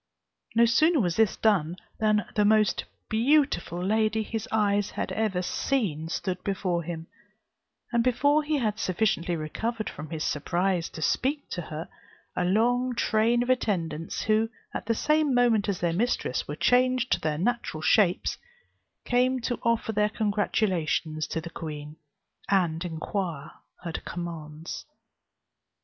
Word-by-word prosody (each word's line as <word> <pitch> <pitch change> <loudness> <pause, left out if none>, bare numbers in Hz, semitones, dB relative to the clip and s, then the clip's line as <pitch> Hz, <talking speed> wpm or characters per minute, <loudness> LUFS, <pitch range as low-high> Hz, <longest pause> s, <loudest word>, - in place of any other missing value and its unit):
No 235 +1 +6
sooner 310 +8 +4
was 175 -7 +1
this 220 -2 +3
done, 180 -7 +2 0.2
than 215 -3 +2
the 210 - +2
most 215 -2 +3 0.2
beautiful 225 - +2
lady 220 +1 +2
his 225 0 -4
eyes 205 -2 +2
had - - -4
ever 200 -5 0
seen 175 - -1
stood 185 +1 -3
before 185 -3 -1
him: 165 -1 -6 0.9
and 235 -1 +2
before 285 +5 +3
he 300 0 0
had 215 -5 -1
sufficiently 180 -2 0
recovered 215 +9 -3
from 150 +1 -8
his 155 -1 -3
surprise 175 +3 0
to 160 - -6
speak 285 - 0
to 175 - -3
her, 155 0 -6 0.5
a - - 0
long 245 +7 +2
train 235 +1 +2
of 250 - +1
attendants, 165 -10 -1
who, 220 +1 +2 0.2
at - - -5
the 230 - +2
same 305 +1 +2
moment 230 -4 +3
as 195 - -2
their 170 -1 +1
mistress, 205 - 0
were 145 - -4
changed 255 +5 +2
to - - +3
their 150 -1 -1
natural 190 -5 -1
shapes, 190 -6 +3 0.7
came 255 +1 +2
to 245 +1 -2
offer 230 -1 +1
their 210 0 +2
congratulations 195 -7 0
to - - -2
the 170 +1 -8
queen, 150 -2 -7 0.5
and 175 -4 +2
inquire 170 -2 -4 0.3
her 170 - -4
commands. 165 -2 -6
205 Hz, 145 wpm, -27 LUFS, 170-235 Hz, 0.9 s, No